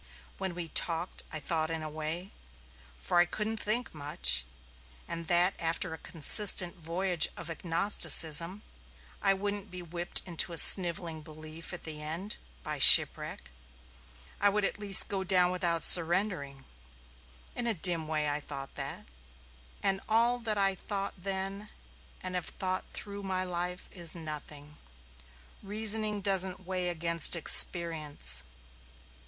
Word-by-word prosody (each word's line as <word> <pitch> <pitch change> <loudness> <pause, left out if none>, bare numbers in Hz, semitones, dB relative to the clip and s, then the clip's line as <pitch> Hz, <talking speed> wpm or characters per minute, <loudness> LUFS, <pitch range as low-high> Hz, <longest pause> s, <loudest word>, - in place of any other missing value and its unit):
When 190 -3 -5
he 170 -2 -6
talked 170 +3 0
I 155 - -5
thought 160 +1 -3
in 160 -1 -5
a - - -6
way 155 +5 -6 0.7
for 175 - -1
I 175 - +4
couldn't 215 +4 -4
think 230 +3 -2
much 65 - 0 0.6
that 175 +2 +2
after 165 +1 -3
a 160 - -10
consistent 180 +3 +4
voyage 175 0 0
of 170 -1 -7
agnosticism, 170 +1 -1 0.6
I 195 0 +1
wouldn't 205 +1 -5
be 180 -1 -10
whipped 175 +1 -3
into 170 -1 -1
snivelling 170 -3 +6
belief 155 +1 -10
at 175 - -6
the 155 -1 -5
end, 165 +7 -6 0.3
by - - -6
shipwreck. - - +6 0.9
I 205 - +3
would 205 0 -1
at 210 - -4
least 200 -2 +3
go 195 -1 -4
down 180 -1 +2
without 170 -3 -2
surrendering. 170 -6 +2 0.9
In 240 - -4
a 230 - -1
dim 165 -2 +2
way 155 -1 -2
I 145 0 -3
thought 140 -2 -9
that. - - -7 0.8
And 195 0 -1
all 235 +2 +2
that 220 -3 -3
I 195 -1 +1
thought 195 +1 -6
then, 195 +2 -6 0.5
and 185 0 -6
have 180 -2 -4
thought 185 0 -3
through 200 0 -8
my 190 -1 -3
life, 180 0 -5
is 170 -3 -2
nothing. 150 -2 -9 0.8
Reasoning 215 0 0
doesn't 190 -1 +1
weigh 180 -1 -2
against 170 -1 -2
experience. 160 - +4
175 Hz, 135 wpm, -29 LUFS, 160-195 Hz, 0.9 s, snivelling